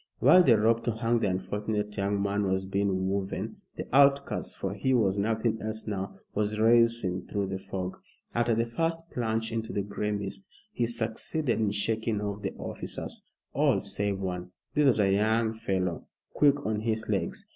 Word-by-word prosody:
While 185 - +7
the 125 -10 +5
rope 115 +2 +2
to 120 - +1
hang 115 +1 +1
the 105 -3 +1
unfortunate 105 +2 -2
young 100 0 0
man 100 0 0
was 95 0 0
being 95 -1 0
woven, 95 0 -3 0.2
the - - -4
outcast 140 0 +3
for 95 0 -3
he 130 +6 +1
was 100 -4 +2
nothing 110 +1 0
else 110 +1 -4
now 100 -2 -4 0.2
was 105 +1 0
racing 115 -5 +3
through 100 -2 -2
the 95 0 -3
fog. 95 -1 -5 0.4
After 120 -1 +2
the 115 +1 +1
first 165 +7 -1
plunge 115 -1 -1
into 115 0 -3
the 100 - -1
gray 105 +1 -3
mist, 100 -1 -4 0.3
he 120 - 0
succeeded 120 +4 -1
in 110 -2 +2
shaking 110 +2 0
off 105 0 -4
the - - -4
officers - - -6 0.3
all - - +3
save 100 -1 -2
one. 90 -2 -4 0.2
This 150 -1 +4
was 120 -4 +4
a 95 -2 +4
young 110 +2 +2
fellow, 95 -5 -2 0.3
quick 145 -1 +3
on 110 -1 0
his 110 0 -1
legs. - - -1
105 Hz, 180 wpm, -28 LUFS, 100-115 Hz, 0.4 s, While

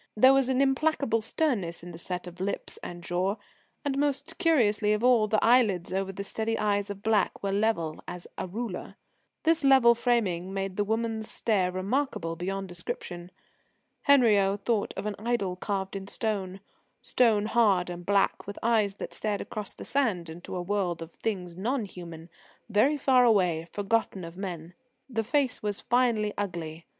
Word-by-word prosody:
There 260 +5 +7
was 270 -1 +3
an 260 0 +2
implacable 275 -4 +1
sternness 215 - -1
in 175 - -8
the 165 - -10
set 180 +1 -4
of 180 0 -10
lips 200 +1 -2
and 175 0 -8
jaw, 180 +4 0 0.5
and, 275 -1 0
most 290 +3 -1
curious 255 - +3
of 210 +1 +1
all, 245 -4 +5
the 215 +1 +2
eyelids 215 -8 +3
over 195 0 -1
the 200 +1 -6
steady 225 +2 -1
eyes 205 -1 0
of 200 0 -7
black 215 -4 +1
were 200 - 0
level 195 -6 0
as 180 -1 -7
a - - -4
ruler. 210 0 -5 0.5
This 325 -1 +3
level 265 -4 +7
framing 210 -7 0
made 195 -1 -3
the 205 - +1
woman's 220 +1 -2
stare 190 -5 0
remarkable 185 - -1
beyond 195 +3 -3
description. 175 0 -6 0.8
Henriot 205 -8 +4
thought 225 -4 +1
of - - -4
an 210 - -1
idol 215 -5 -1
carved 195 0 -3
in 195 0 -5
stone, 195 -3 -3 0.4
stone 220 -4 +3
hard 205 -6 +3
and 175 0 -7
black, 200 +1 +1
with 200 - -6
eyes 220 -4 +2
that - - -7
stared 210 -2 -1
across 210 -2 -5
the - - -10
sand 205 -12 0
into 175 +3 -8
a 180 - -2
world 180 -3 -1
of 165 - -12
things 180 -4 -4
non 230 +5 -1
human, 170 -4 -10 0.4
very 240 +8 +3
far 260 -2 +4
away, 180 -8 +3
forgotten 205 -2 -1
of 165 0 -8
men. 180 -3 -6 0.3
The 225 -4 -2
face 265 +2 +1
was 205 -1 -1
finely 235 -4 +1
ugly. 170 -4 -5
205 Hz, 170 wpm, -28 LUFS, 180-235 Hz, 0.8 s, There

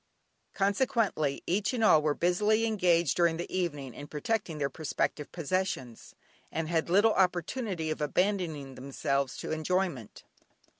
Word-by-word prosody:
Consequently, 200 - +1
each 200 +7 0
and 230 - 0
all 160 -7 +6
were 150 -1 +1
busily 210 +6 +2
engaged 175 - +2
during 170 -2 +2
the 175 +2 -5
evening 145 -8 -2
in 145 - -9
protecting 165 +3 -2
their 140 -2 0
prospective 150 0 -3
possessions, 165 -8 -3 0.4
and 165 -1 -2
had 165 0 0
little 205 +5 +5
opportunity 180 -1 0
of 155 - -4
abandoning 160 -4 -1
themselves 135 0 -2
to - - -5
enjoyment. 160 - -2
170 Hz, 135 wpm, -30 LUFS, 150-195 Hz, 0.4 s, all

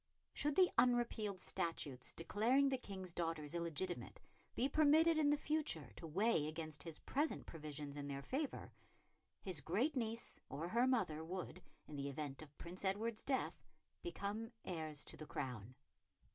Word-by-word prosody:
Should 295 -1 +1
the 365 0 +6
unrepealed 235 -5 +3
statutes 140 -8 -2
declaring 240 +11 +3
the 265 - +1
King's 190 -6 -6
daughters 165 -3 -1
illegitimate 170 +1 -2 0.4
be 260 - +3
permitted 315 +3 +6
in 295 -2 +5
the 295 - +5
future 290 - 0
to 165 - -7
weigh 175 -1 +3
against 155 -1 -4
his 165 -1 -5
present 295 +3 0
provisions 150 -2 -5
in 145 -1 -4
their 140 -1 -3
favour, 275 - -2 0.7
his 180 -7 -1
great 225 - +1
niece 230 -2 -2
or 150 +5 -3
her 240 +5 +4
mother 160 -12 +2
would, 180 +1 -4 0.3
in 150 - -6
the 140 0 -1
event 140 0 -4
of 150 -2 -12
Prince 180 +3 -7
Edward's 215 +3 0
death, 265 -2 0 0.4
become 225 - -3
heirs 155 -4 -2
to - - -6
the 155 - -7
crown. 125 -3 -4
180 Hz, 155 wpm, -41 LUFS, 155-245 Hz, 0.7 s, the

